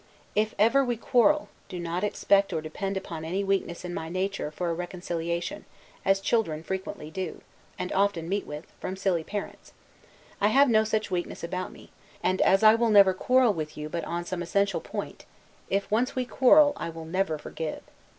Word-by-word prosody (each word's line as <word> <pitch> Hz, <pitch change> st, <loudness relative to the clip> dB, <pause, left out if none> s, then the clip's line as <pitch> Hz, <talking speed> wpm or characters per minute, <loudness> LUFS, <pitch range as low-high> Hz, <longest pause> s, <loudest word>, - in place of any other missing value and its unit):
If 215 Hz, +1 st, 0 dB
ever 230 Hz, +7 st, +4 dB
we 245 Hz, -2 st, -1 dB
quarrel, 275 Hz, +6 st, +3 dB, 0.2 s
do 180 Hz, -, -6 dB
not 170 Hz, +2 st, -3 dB
expect 200 Hz, -1 st, +2 dB
or 160 Hz, -, 0 dB
depend 195 Hz, +5 st, -4 dB
upon 170 Hz, -4 st, -6 dB
any 185 Hz, +5 st, -2 dB
weakness 195 Hz, -3 st, -1 dB
in 175 Hz, -, -5 dB
my 160 Hz, -2 st, -4 dB
nature, 185 Hz, -2 st, -2 dB
for 175 Hz, +3 st, -4 dB
a -, -, 0 dB
reconciliation, 175 Hz, -, -4 dB, 0.4 s
as 195 Hz, 0 st, +3 dB
children 195 Hz, -7 st, 0 dB
frequently 190 Hz, -4 st, -5 dB
do, 185 Hz, +2 st, -5 dB, 0.4 s
and 180 Hz, -1 st, -4 dB
often 195 Hz, -4 st, +1 dB
meet 200 Hz, +3 st, -2 dB
with, 150 Hz, +1 st, -7 dB
from 185 Hz, -, -4 dB
silly 190 Hz, -4 st, 0 dB
parents; 205 Hz, +4 st, -7 dB, 0.7 s
I 205 Hz, -, +5 dB
have 270 Hz, +5 st, +5 dB
no 220 Hz, -1 st, +5 dB
such 215 Hz, -2 st, -1 dB
weakness 175 Hz, -2 st, -3 dB
about 180 Hz, +2 st, -3 dB
me: -, -, -15 dB, 0.3 s
and, 185 Hz, +1 st, +1 dB
as 195 Hz, +2 st, +4 dB
I 215 Hz, 0 st, +9 dB
will 230 Hz, 0 st, +2 dB
never 200 Hz, -3 st, +7 dB
quarrel 250 Hz, +4 st, +3 dB
with 155 Hz, -3 st, -5 dB
you 150 Hz, 0 st, -5 dB
but 170 Hz, +2 st, -3 dB
upon 175 Hz, +1 st, -4 dB
some 175 Hz, 0 st, -4 dB
essential 200 Hz, +3 st, 0 dB
point; -, -, -6 dB, 0.4 s
if 200 Hz, +1 st, -1 dB
once 235 Hz, +4 st, +1 dB
we 255 Hz, -1 st, 0 dB
quarrel, 290 Hz, +4 st, +5 dB
I -, -, -4 dB
will 165 Hz, 0 st, -8 dB
never 170 Hz, -1 st, -1 dB
forgive. 155 Hz, +1 st, -6 dB
190 Hz, 190 wpm, -27 LUFS, 170-210 Hz, 0.7 s, I